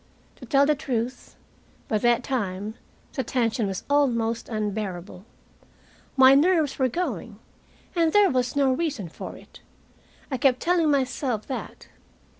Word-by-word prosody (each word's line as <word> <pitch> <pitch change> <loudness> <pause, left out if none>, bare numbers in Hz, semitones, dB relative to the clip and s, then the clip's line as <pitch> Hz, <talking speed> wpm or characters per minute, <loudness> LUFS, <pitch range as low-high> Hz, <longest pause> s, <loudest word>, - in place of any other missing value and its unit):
To - - -12
tell 280 -2 +4
the 300 - +3
truth, 255 -4 -4 0.5
by 215 - 0
that 240 +2 +2
time 210 -5 -3 0.4
the 265 - -2
tension 230 -4 0
was 190 -1 -4
almost 235 -6 +1
unbearable. 205 -4 -4 0.9
My 265 0 +8
nerves 310 -1 +3
were 260 - +3
going, 240 - -4 0.6
and 330 -2 +3
there 410 -2 +5
was 250 0 0
no 275 -2 +3
reason 265 - -2
for - - -8
it. - - -16 0.7
I 260 - 0
kept 255 -2 +3
telling 335 -1 +2
myself 260 -5 0
that. 265 - -7
255 Hz, 135 wpm, -25 LUFS, 220-285 Hz, 0.9 s, My